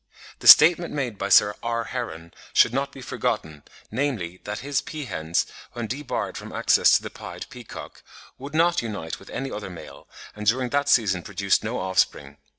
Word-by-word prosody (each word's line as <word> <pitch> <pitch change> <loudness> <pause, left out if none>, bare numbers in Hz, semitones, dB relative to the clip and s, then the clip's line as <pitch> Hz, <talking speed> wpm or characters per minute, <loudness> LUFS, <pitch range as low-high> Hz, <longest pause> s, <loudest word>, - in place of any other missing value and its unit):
The - - -3
statement 170 +2 +8
made 125 -8 -3
by - - -2
Sir 105 - +6
R. 115 0 -2
Heron 85 -10 -6 0.2
should 120 - +5
not 140 +1 -1
be 135 - -11
forgotten, 80 -9 -3 0.3
namely, 110 -9 -3
that 105 +1 -5
his 145 -1 0
peahens, 85 - -2 0.3
when 120 -1 -4
debarred 135 +4 -4
from - - -10
access - - +4
to - - -11
the - - -7
pied - - -8
peacock, - - -10 0.4
would 140 +3 -8
not 170 +2 +3
unite 100 -8 -5
with 95 - -15
any 135 0 -4
other 105 -2 -6
male, 90 - -11 0.3
and 105 0 -6
during 125 +3 +2
that 145 +1 0
season 100 -9 +3
produced 100 +1 0
no 115 +3 -3
offspring. 75 -6 -1
115 Hz, 175 wpm, -24 LUFS, 95-135 Hz, 0.4 s, statement